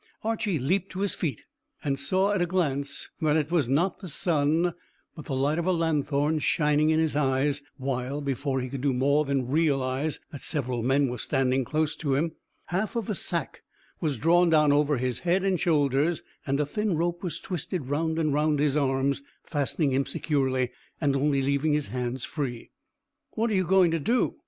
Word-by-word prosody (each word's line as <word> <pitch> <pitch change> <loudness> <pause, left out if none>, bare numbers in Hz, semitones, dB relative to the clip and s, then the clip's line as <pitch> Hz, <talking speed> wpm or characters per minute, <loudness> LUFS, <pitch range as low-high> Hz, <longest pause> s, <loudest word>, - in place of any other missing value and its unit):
Archy 220 -5 0
leaped 185 +8 0
to 185 - -4
his 200 - +1
feet, 145 - -3 0.4
and 135 -1 -1
saw 185 +8 +2
at 205 -3 +1
a 175 - +2
glance 140 -6 -1
that 155 -1 +3
it 155 0 -1
was 160 -8 +2
not 170 +7 +1
the 190 - -8
sun, 160 +1 +1 0.4
but 155 - -9
the 135 - -3
light 145 +5 +1
of 170 - -2
a - - +4
lanthorn 155 -2 +1
shining 150 0 +2
in 160 0 +3
his 160 -2 +1
eyes, 140 0 +1 0.2
while, 135 +1 -2
before 135 -1 -1
he 125 - -3
could 130 0 -5
do 140 -1 +1
more 140 +4 +3
than 135 -3 0
realise 140 -1 0
that 145 - -8
several 130 -6 -1
men 135 +4 +2
were 125 -1 -4
standing 135 0 +1
close 155 +3 -1
to 145 -4 -1
him, 160 +4 0 0.4
half 215 +6 -1
of 225 -3 -2
a - - +1
sack 170 -5 -3 0.4
was 150 -5 -1
drawn 170 +6 +4
down 150 -2 +5
over 145 0 +3
his 125 -1 -1
head 180 +2 +1
and 190 -3 +1
shoulders, 150 0 +2 0.2
and 140 +1 +1
a 150 - +2
thin 210 +3 -1
rope 175 +2 -1
was 170 -4 -4
twisted 175 -4 -4
round 160 +2 0
and 155 -3 +1
round 150 +1 +2
his 145 -1 +2
arms, 140 -1 +1 0.2
fastening 145 0 0
him 135 +1 +1
securely, 130 -4 0 0.3
and 140 -3 +1
only 140 0 +2
leaving 140 +3 +1
his 150 -5 0
hands 125 +2 -3
free. 130 -6 -5 0.6
"What 225 +1 0
are - - +1
you 185 -1 +2
going 185 -2 +5
to 165 - 0
do?" 235 - +1
150 Hz, 195 wpm, -27 LUFS, 135-170 Hz, 0.6 s, down